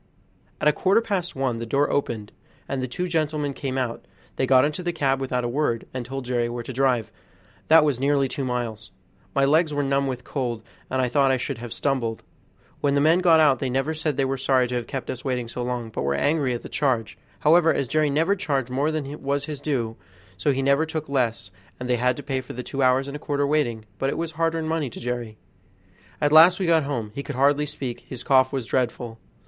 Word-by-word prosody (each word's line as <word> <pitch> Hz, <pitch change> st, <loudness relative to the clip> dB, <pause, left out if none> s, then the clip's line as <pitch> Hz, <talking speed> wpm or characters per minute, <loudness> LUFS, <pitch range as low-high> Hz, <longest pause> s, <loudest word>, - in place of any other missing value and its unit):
At -, -, +1 dB
a 150 Hz, -, +5 dB
quarter 195 Hz, +4 st, +3 dB
past 195 Hz, -6 st, -2 dB
one 130 Hz, -3 st, -1 dB
the 115 Hz, -, -4 dB
door 140 Hz, +5 st, +1 dB
opened, 110 Hz, -7 st, -2 dB, 0.4 s
and 135 Hz, -1 st, -2 dB
the 130 Hz, -, -2 dB
two 180 Hz, +9 st, -3 dB
gentlemen 155 Hz, -4 st, -1 dB
came 135 Hz, -1 st, -4 dB
out; 125 Hz, -3 st, -3 dB, 0.3 s
they 130 Hz, -, 0 dB
got 130 Hz, 0 st, +6 dB
into 150 Hz, +4 st, -2 dB
the 175 Hz, -1 st, -1 dB
cab 135 Hz, -5 st, 0 dB
without 125 Hz, -2 st, -1 dB
a -, -, 0 dB
word, 120 Hz, -2 st, -1 dB
and 130 Hz, -1 st, -3 dB
told 135 Hz, +1 st, -6 dB
Jerry 120 Hz, -1 st, 0 dB
where 120 Hz, 0 st, -4 dB
to 130 Hz, -, -7 dB
drive, 125 Hz, -4 st, +1 dB, 0.6 s
that 160 Hz, 0 st, +7 dB
was 140 Hz, -5 st, 0 dB
nearly 140 Hz, 0 st, +2 dB
two 140 Hz, +1 st, -4 dB
miles. 120 Hz, -4 st, -3 dB, 0.5 s
My 140 Hz, 0 st, +4 dB
legs 155 Hz, +1 st, +3 dB
were 145 Hz, -, +1 dB
numb 140 Hz, 0 st, +1 dB
with 125 Hz, -2 st, -4 dB
cold, 120 Hz, -5 st, -3 dB, 0.3 s
and 130 Hz, 0 st, 0 dB
I -, -, +2 dB
thought 135 Hz, +2 st, +3 dB
I 130 Hz, -, +3 dB
should 125 Hz, -, -4 dB
have 120 Hz, -1 st, -7 dB
stumbled. 120 Hz, -5 st, -1 dB, 0.6 s
When 140 Hz, -1 st, +1 dB
the -, -, +3 dB
men 160 Hz, +4 st, +4 dB
got 170 Hz, -3 st, +5 dB
out 145 Hz, -5 st, +4 dB
they 130 Hz, -, -1 dB
never 135 Hz, +5 st, 0 dB
said 155 Hz, -3 st, -2 dB
they 135 Hz, -, +2 dB
were 135 Hz, 0 st, -1 dB
sorry 130 Hz, -1 st, +2 dB
to -, -, -4 dB
have 120 Hz, -2 st, -3 dB
kept 135 Hz, -3 st, -4 dB
us 125 Hz, -, -7 dB
waiting 125 Hz, -3 st, -2 dB
so 120 Hz, +1 st, -5 dB
long, 120 Hz, -2 st, -3 dB
but -, -, -4 dB
were 70 Hz, 0 st, 0 dB
angry 140 Hz, -, +1 dB
at 120 Hz, -, -7 dB
the -, -, -7 dB
charge; 125 Hz, -6 st, 0 dB, 0.3 s
however, 165 Hz, +2 st, +5 dB
as 135 Hz, -, -1 dB
Jerry 155 Hz, +3 st, +2 dB
never 160 Hz, +8 st, +2 dB
charged 135 Hz, -9 st, -2 dB
more 140 Hz, +4 st, +1 dB
than 150 Hz, -2 st, -4 dB
was 140 Hz, 0 st, -1 dB
his 150 Hz, -2 st, -6 dB
due, 120 Hz, -7 st, -2 dB, 0.4 s
so 95 Hz, +9 st, +1 dB
he 135 Hz, 0 st, -1 dB
never 140 Hz, +4 st, +3 dB
took 155 Hz, -2 st, -4 dB
less, 120 Hz, -7 st, -1 dB, 0.3 s
and 125 Hz, -, -4 dB
they 125 Hz, -1 st, +2 dB
had 125 Hz, +1 st, +1 dB
to 145 Hz, -, -7 dB
pay 135 Hz, -1 st, -2 dB
for 130 Hz, -, -9 dB
the 125 Hz, -, -5 dB
two 135 Hz, -, -4 dB
hours 130 Hz, +1 st, +3 dB
and 140 Hz, -, -6 dB
a -, -, -5 dB
quarter 145 Hz, -2 st, 0 dB
waiting; 125 Hz, -7 st, 0 dB
but 135 Hz, -, +1 dB
it -, -, -3 dB
was 165 Hz, -1 st, -3 dB
hard 165 Hz, +1 st, 0 dB
earned 160 Hz, -1 st, -2 dB
money 160 Hz, -4 st, -1 dB
to -, -, -9 dB
Jerry. 120 Hz, -3 st, -4 dB, 0.8 s
At 145 Hz, -1 st, +2 dB
last 165 Hz, +4 st, +8 dB
we 190 Hz, -, 0 dB
got 165 Hz, -3 st, +3 dB
home; 120 Hz, -7 st, -3 dB
he 140 Hz, -, -4 dB
could -, -, -6 dB
hardly 145 Hz, +3 st, +3 dB
speak, 130 Hz, -4 st, -5 dB
and -, -, -27 dB
his 125 Hz, -2 st, -6 dB
cough 130 Hz, -2 st, +4 dB
was 135 Hz, -4 st, -2 dB
dreadful. 120 Hz, -2 st, -2 dB
135 Hz, 245 wpm, -24 LUFS, 125-150 Hz, 0.8 s, last